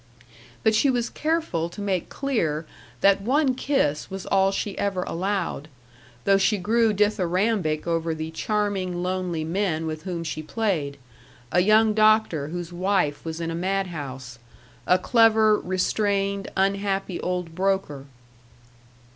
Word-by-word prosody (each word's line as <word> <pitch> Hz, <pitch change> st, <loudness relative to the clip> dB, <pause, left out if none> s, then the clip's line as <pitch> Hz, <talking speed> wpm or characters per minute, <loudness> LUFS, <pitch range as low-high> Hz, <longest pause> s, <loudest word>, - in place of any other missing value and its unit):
But 220 Hz, -, +4 dB
she 245 Hz, +6 st, +3 dB
was 240 Hz, -2 st, 0 dB
careful 310 Hz, -, -1 dB
to 170 Hz, -, -11 dB
make 195 Hz, -4 st, -2 dB
clear 165 Hz, -, -1 dB, 0.4 s
that 195 Hz, 0 st, +4 dB
one 265 Hz, +5 st, +2 dB
kiss 250 Hz, -, 0 dB
was 190 Hz, 0 st, -6 dB
all 195 Hz, 0 st, +3 dB
she 195 Hz, 0 st, -3 dB
ever 195 Hz, -2 st, -1 dB
allowed, 185 Hz, -5 st, -2 dB, 0.6 s
though 195 Hz, 0 st, +4 dB
she 210 Hz, +2 st, +2 dB
grew 225 Hz, +4 st, +2 dB
dithyrambic 195 Hz, -4 st, +1 dB
over 165 Hz, -1 st, -1 dB
the 160 Hz, 0 st, -5 dB
charming, 190 Hz, -2 st, -1 dB
lonely 180 Hz, -3 st, -2 dB
men 165 Hz, -1 st, -1 dB
with 155 Hz, -1 st, -4 dB
whom 175 Hz, -1 st, -4 dB
she 155 Hz, -1 st, -4 dB
played 155 Hz, -6 st, -2 dB, 0.5 s
a 180 Hz, -, +3 dB
young 215 Hz, +3 st, +4 dB
doctor 215 Hz, -8 st, +3 dB
whose 175 Hz, +1 st, -6 dB
wife 180 Hz, -5 st, 0 dB
was 160 Hz, 0 st, -5 dB
in 165 Hz, 0 st, -3 dB
a -, -, -3 dB
madhouse; 160 Hz, -9 st, -3 dB, 0.5 s
a 180 Hz, -, +5 dB
clever, 220 Hz, +1 st, +4 dB
restrained, 195 Hz, +1 st, -1 dB
unhappy 195 Hz, -1 st, 0 dB
old 180 Hz, -2 st, -3 dB
broker. 185 Hz, -7 st, -1 dB
190 Hz, 135 wpm, -24 LUFS, 165-210 Hz, 0.6 s, a